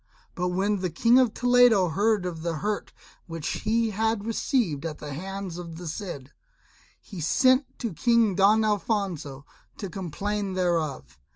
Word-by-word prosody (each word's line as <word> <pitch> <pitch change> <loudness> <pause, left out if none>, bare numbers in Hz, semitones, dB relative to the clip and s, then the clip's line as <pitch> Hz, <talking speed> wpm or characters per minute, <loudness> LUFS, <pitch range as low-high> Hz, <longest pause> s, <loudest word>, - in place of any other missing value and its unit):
But 180 -1 -2
when 195 +3 0
the 185 -1 -1
King 235 +9 +4
of 250 -4 +3
Toledo 245 -6 +4
heard 205 +3 +1
of 170 -3 -4
the 170 0 -2
hurt 205 +6 -3 0.4
which 165 -2 -4
he 225 +1 +1
had 220 0 -1
received 225 - 0
at 160 -2 -4
the 145 -1 -7
hands 190 +2 -6
of 170 -2 -8
the 175 - -8
Cid, 155 -6 -6 0.7
he 190 -6 -9
sent 255 - +2
to 230 -6 -4
King 230 +1 +3
Don 205 +4 +4
Alfonso 190 - -2 0.3
to 195 -4 -6
complain 195 +3 -3
thereof. 165 - -2
195 Hz, 155 wpm, -26 LUFS, 165-220 Hz, 0.7 s, King